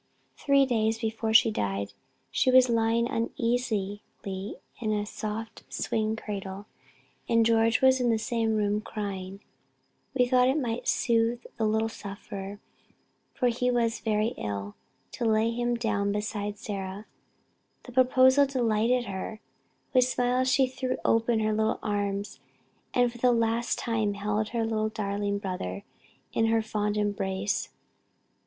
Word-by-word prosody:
Three 275 -1 +3
days 225 -3 +1
before 225 0 -2
she 225 0 +6
died, 100 - -2 0.4
she 255 - +2
was 255 0 +6
lying 230 +1 +2
uneasily 230 -4 -1 0.2
in 195 +1 -5 0.3
a 210 -1 0 0.2
large 215 +1 -3 0.2
swing 220 0 -1
cradle, 200 -2 -6 0.6
and 230 -1 +4
George 225 0 +3
was 260 0 +5
in 245 - +2
the 225 - +3
same 225 0 0
room 210 0 +1
crying. 195 -2 -5 0.7
We 250 -1 +4
thought 250 0 +4
it 265 +3 +2
might 240 -3 -3
soothe 235 0 +1
the 220 - +1
little 220 +1 +1
sufferer, 200 -1 -7 0.8
for 250 - +2
he 250 +1 0
also 245 -1 +2
was 230 -1 0
very 215 0 +1
ill, 100 0 -4 0.4
to 240 - -3
lay 220 +1 +3
him 240 +1 0
down 205 -4 0
beside 210 0 -3
Sarah. 195 0 -5 0.8
The 250 - -11
proposal 260 +2 +5
delighted 240 -1 +1
her; 200 +2 -5 0.5
with 255 -1 +5
smiles 250 +1 +1
she 265 0 +4
threw 255 0 -3
open 230 0 +3
her 215 0 +1
little 220 +1 +1
arms 205 -1 -2 0.5
and 245 -1 +2
for 240 - -12
the 250 +1 +4
last 230 0 +1
time 220 -3 -1
held 210 +1 -1
her 230 -1 -1 0.3
darling 200 -1 -1
brother 180 - -4 0.5
in 225 - +2
her 225 0 +2
fond 210 -1 -1
embrace. 200 -1 -1
225 Hz, 140 wpm, -28 LUFS, 205-240 Hz, 0.8 s, she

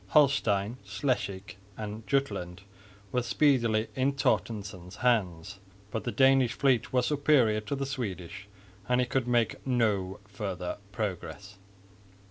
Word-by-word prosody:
Holstein, 115 -6 +3
Schleswig 100 -3 -2 0.2
and 110 0 -6
Jutland 95 -10 -1 0.5
were 125 - +1
speedily 120 -4 +2
in 135 +2 +1
Torstensson's 100 -8 -1
hands, 100 -6 0 0.3
but 110 - -3
the 120 - -1
Danish 130 -2 +4
fleet 130 -4 +2
was 125 -1 +2
superior 140 -7 +3
to 125 +7 -3
the 135 0 -2
Swedish, 100 -8 -5 0.4
and 125 0 +3
he 125 - +3
could 125 0 -1
make 120 -2 +1
no 105 -7 0
further 95 -3 -5
progress. 100 0 -5
110 Hz, 120 wpm, -29 LUFS, 100-130 Hz, 0.5 s, Danish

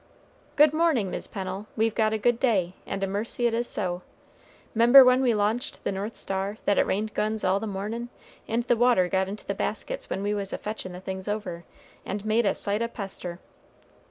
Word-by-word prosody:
"Good 300 0 +6
mornin', 310 - +2
Mis' - - -3
Pennel; 195 +1 -5
we've 225 0 +2
got 215 -1 +2
a 220 - 0
good 235 +2 +2
day, 195 -9 +1
and 195 0 -3
a - - +1
mercy 210 +5 -2
it 235 - +2
is 240 +1 0
so. 180 -3 -2 0.7
'Member 240 +4 +9
when 255 +1 +5
we 245 -4 +3
launched 220 +7 -1
the - - -1
North 200 +4 -4
Star, 195 +2 -3
that 205 - +3
it - - +3
rained 215 +2 -1
guns 215 +1 -1
all 185 +1 +2
the 220 - -4
mornin', 215 +4 -4 0.4
and 230 +2 0
the 240 0 +2
water 235 -6 +4
got 190 +1 0
into 205 +2 -7
the - - -2
baskets - - -3
when 195 - -2
we 205 +1 0
was 200 -2 -3
a - - -2
fetchin' 210 -4 -6
the 180 - -7
things 190 0 -5
over, 190 -5 -4 0.4
and 200 +2 -5
made 215 +1 +2
a - - +2
sight 205 +2 0
o' 235 - +1
pester." 195 -6 -6
210 Hz, 215 wpm, -26 LUFS, 195-235 Hz, 0.7 s, Member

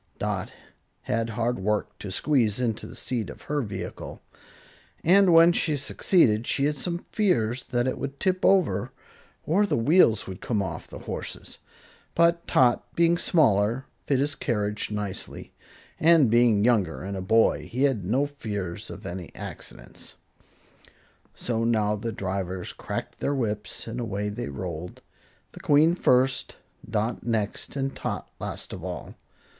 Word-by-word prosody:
Dot - - -2 0.5
had 115 +1 -1
hard 120 +2 -1
work 105 +2 -1
to 100 - -6
squeeze 115 0 +1
into 115 -4 -2
the - - -11
seat 115 -6 -3
of - - -10
her 145 0 -1
vehicle, 100 -6 -6 0.8
and 190 +2 +6
when 165 +1 +8
she 155 -3 +1
succeeded 125 - +2
she 140 - +1
had 150 +1 +1
some 170 +4 -3
fears 125 - +1
that 120 0 0
it 130 - -2
would 140 0 -5
tip 185 -1 0
over, 165 - +3 0.5
or 190 +7 +3
the - - +1
wheels 115 - +4
would 95 -1 -8
come 110 -4 -1
off 95 - -4
the - - -9
horses. - - -6 0.6
But 170 0 +3
Tot, 120 -2 +2
being 170 0 +4
smaller, 120 - +2 0.2
fit 140 - +3
his 145 +3 +1
carriage 105 -5 -1
nicely, 105 -2 -5 0.5
and 160 -7 +5
being 115 -3 +4
younger 105 -8 +2
and 100 +1 -4
a 95 - -4
boy, 110 +5 +3
he 130 +3 0
had 130 -8 +2
no 125 +10 +1
fears 105 -11 -5
of - - -9
any 90 -1 -6
accidents. - - -8 1.2
So 115 -2 -2
now 110 -2 +2
the 115 +2 -4
drivers 95 -2 -4
cracked - - -6
their 140 - 0
whips 105 -5 -3
and 115 +2 -4
away 105 -3 -2
they 105 -8 -5
rolled, 85 +3 -6 0.5
the - - -12
Queen 150 +3 +4
first, 130 -5 +2 0.3
Dot 110 +2 -1
next 110 -1 -2
and 135 -1 -2
Tot - - -4
last - - -6
of - - -7
all. - - -6
115 Hz, 150 wpm, -26 LUFS, 105-145 Hz, 1.2 s, when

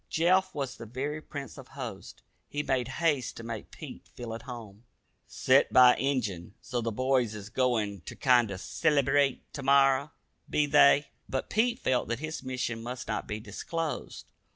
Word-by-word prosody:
Jeff 180 +2 +2
was 140 -3 -3
the 115 - -9
very 140 +6 -4
prince 140 -2 -8
of - - -11
hosts. - - -8 0.3
He 145 0 -2
made 130 -4 0
haste 145 -1 0
to 115 - -7
make 115 -2 -6
Pete - - -10
feel 120 -2 -7
at 115 - -6
home. 115 -5 -9 0.4
"Set - - +3
by, 125 -1 +8
Injun. 105 -10 -2
So 125 -2 -3
the 115 0 -2
boys 125 -1 +1
is 105 0 -8
goin' 115 -6 0
ter - - -8
kinder 120 -7 +3
cellybrate 140 +5 +2
ter 140 - -5
morrer, 140 +1 +4 0.4
be 150 - +2
they?" 145 -1 +5 0.2
But 130 - -3
Pete 235 +2 +2
felt 130 - 0
that 120 - -1
his 155 +4 -5
mission 125 -3 -3
must 125 +2 -6
not 110 - -3
be 105 - -4
disclosed. 155 +10 -5
130 Hz, 170 wpm, -29 LUFS, 115-145 Hz, 0.4 s, by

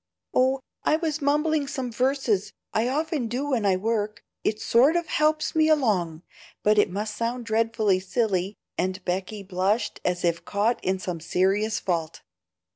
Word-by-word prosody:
"Oh, 260 +1 +3 0.2
I - - +3
was 315 -2 -2
mumbling 295 +1 +1
some 265 -3 -4
verses. 250 -5 0 0.2
I 225 +2 +2
often 300 -2 -1
do 265 +5 -2
when 225 -6 +1
I 190 - +4
work, 210 +1 -2 0.2
it 215 - 0
sort 260 +10 +4
of 345 -1 +1
helps 310 0 +1
me 315 0 +4
along; 190 - +1 0.4
but 210 0 +4
it 205 - +4
must 210 +3 -3
sound 235 +2 -2
dreadfully 220 -3 +2
silly," 195 -1 -1 0.2
and 185 +1 -2
Becky 190 +3 -3
blushed 195 +4 -1
as 180 0 0
if 170 -1 0
caught 215 +4 0
in 190 +1 +1
some 180 -2 -4
serious 195 +6 +1
fault. 165 -3 -2
220 Hz, 160 wpm, -25 LUFS, 190-265 Hz, 0.4 s, I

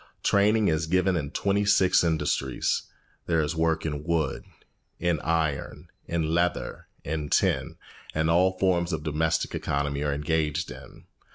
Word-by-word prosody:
Training 105 +1 +3
is 80 0 +1
given 90 +2 +2
in 75 -5 -2
twenty 100 +6 0
six 95 -3 +4
industries. 75 -5 0 0.4
There 85 -1 +2
is 75 +1 -1
work 80 0 +1
in 75 -2 -3
wood, 80 -4 -1 0.5
in 85 -2 0
iron, 80 -3 -2 0.2
in 80 -2 -1
leather, 85 0 -1 0.2
in 75 0 -3
tin; - - +1 0.4
and 80 +1 +1
all 90 +3 +3
forms 90 -2 +1
of 75 -2 -3
domestic 80 +1 0
economy 70 0 -2
are 75 - 0
engaged 75 +2 -1
in. - - -12
80 Hz, 145 wpm, -26 LUFS, 75-85 Hz, 0.5 s, six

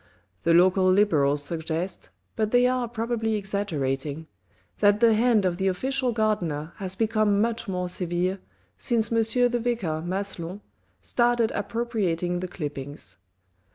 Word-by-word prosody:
The 165 0 +3
local 185 +1 +5
Liberals 150 -8 +3
suggest, 165 +3 -4 0.3
but 215 -1 0
they 245 +2 +4
are 250 -1 +1
probably 225 -1 -2
exaggerating, 160 -8 -2 0.5
that 205 0 +4
the 230 0 +5
hand 220 -2 +3
of 175 -2 0
the 190 0 0
official 255 +7 0
gardener 175 -9 -1
has 190 -2 -5
become 215 -1 +2
much 230 +1 0
more 180 -2 -2
severe, 180 +1 -1 0.4
since 230 -3 +1
M. 230 - +2 0.3
the 240 - 0
Vicar 225 -10 -1
Maslon 185 +1 -4 0.4
started 240 - +2
appropriating 200 -6 -1
the 185 - -4
clippings. 145 - -7
195 Hz, 130 wpm, -25 LUFS, 175-225 Hz, 0.5 s, local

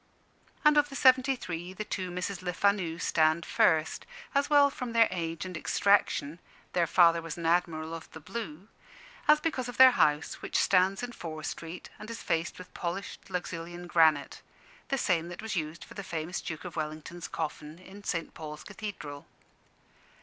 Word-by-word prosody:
And 300 0 +6
of 295 0 +4
the 275 - -8
seventy 260 +1 +5
three, 180 -5 -6
the 215 - -4
two 185 -3 -3
Misses 180 +2 -3
Lefanu 180 -2 0
stand 160 0 +2
first, 160 -1 +2 0.3
as 280 0 +2
well 285 -1 +6
from 250 -3 -5
their 230 -1 +6
age 165 -1 -3
and 185 -1 -6
extraction 170 -3 +2 0.3
(their 170 -2 +2
father 170 -1 +5
was 165 0 -6
an 170 - -5
Admiral 165 -1 +1
of 165 -1 -8
the 160 - -10
Blue) 180 0 -7 0.6
as 300 0 +7
because 265 -7 -2
of 245 - -8
their 260 0 +10
house, 150 -9 +1
which - - -1
stands 190 +3 +3
in 245 - -4
Fore 160 -8 -7
Street 165 +3 -6
and 215 - -9
is 230 - -6
faced 165 0 -1
with 185 - -11
polished 185 +4 -5
Luxulyan 175 -1 -5
granite 160 -4 +3 0.5
the 275 - 0
same 170 -8 +1
that 175 - -8
was 220 -2 -3
used 160 -1 -3
for - - -13
the - - -6
famous 170 -1 -4
Duke 160 +2 -6
of 180 - -7
Wellington's 155 +2 -5
coffin 155 0 -5
in 190 +3 -13
St. 165 -4 -3
Paul's 150 -1 -8
Cathedral. 195 -9 -7
175 Hz, 175 wpm, -30 LUFS, 160-205 Hz, 0.6 s, their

